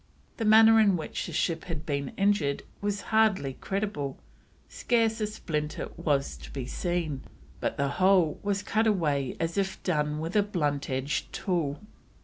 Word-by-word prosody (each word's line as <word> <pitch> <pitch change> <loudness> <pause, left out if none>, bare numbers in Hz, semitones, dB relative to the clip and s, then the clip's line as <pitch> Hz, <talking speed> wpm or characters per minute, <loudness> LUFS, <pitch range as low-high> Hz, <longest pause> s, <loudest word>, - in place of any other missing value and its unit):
The 225 - -2
manner 220 +1 +7
in 200 -4 +4
which 155 - -4
the - - -6
ship 165 -2 -1
had 165 -3 -5
been 140 -2 -2
injured 195 -8 +1 0.2
was 205 0 -1
"hardy 210 -11 +3
credible, 195 -9 -2 0.5
scarce 225 -2 +1
a 210 - +1
splinter 155 -8 -3
was 145 -5 0
to - - -11
be 135 -3 -5
seen, 165 -1 -2 0.4
but - - -2
the 140 - +1
whole 180 +1 +3
was 200 0 -1
cut 220 +2 +1
away 150 - 0
as 165 +3 -1
if 190 -1 -2
done 150 -4 0
with 165 +5 -4
a 210 - +6
blunt 150 -8 -1
edged 135 +2 -2
tool." 165 -6 -1
170 Hz, 160 wpm, -28 LUFS, 145-205 Hz, 0.5 s, manner